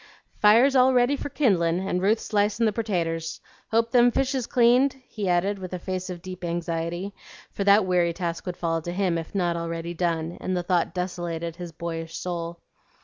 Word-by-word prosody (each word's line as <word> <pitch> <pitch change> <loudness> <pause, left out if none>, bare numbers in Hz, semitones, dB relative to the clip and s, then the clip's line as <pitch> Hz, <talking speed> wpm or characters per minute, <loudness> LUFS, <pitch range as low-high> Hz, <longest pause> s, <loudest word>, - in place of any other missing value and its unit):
"Fire's 235 +6 +6
all 255 0 +5
ready 245 +3 +4
for 285 - -5
kindlin', 180 - +2
and 180 -2 0
Ruth's 215 +4 +1
slicin' 210 +2 +2
the 215 - +3
pertaters. 165 -7 -2 0.3
Hope 230 +1 +1
them 245 -1 +6
fish 270 +3 0
is 255 -3 -2
cleaned?" 250 +3 +4
he 205 -4 -3
added 190 +3 +1
with 185 -1 -7
a - - -1
face 185 +1 -4
of 175 -1 -7
deep 185 -1 -8
anxiety; 170 +2 -3 0.4
for 200 - -3
that 200 0 +6
weary 175 -2 +2
task 170 +1 -4
would 180 -1 -4
fall 165 -2 -1
to 175 - -5
him 185 -2 +1
if 165 +4 -9
not 175 -3 +1
already 170 0 -4
done, 165 -1 -2
and 185 -1 -1
the 175 - -1
thought 175 -1 0
desolated 170 -2 -3
his 175 -2 -7
boyish 165 0 -5
soul. 170 -1 -4
180 Hz, 195 wpm, -25 LUFS, 170-210 Hz, 0.4 s, Fire's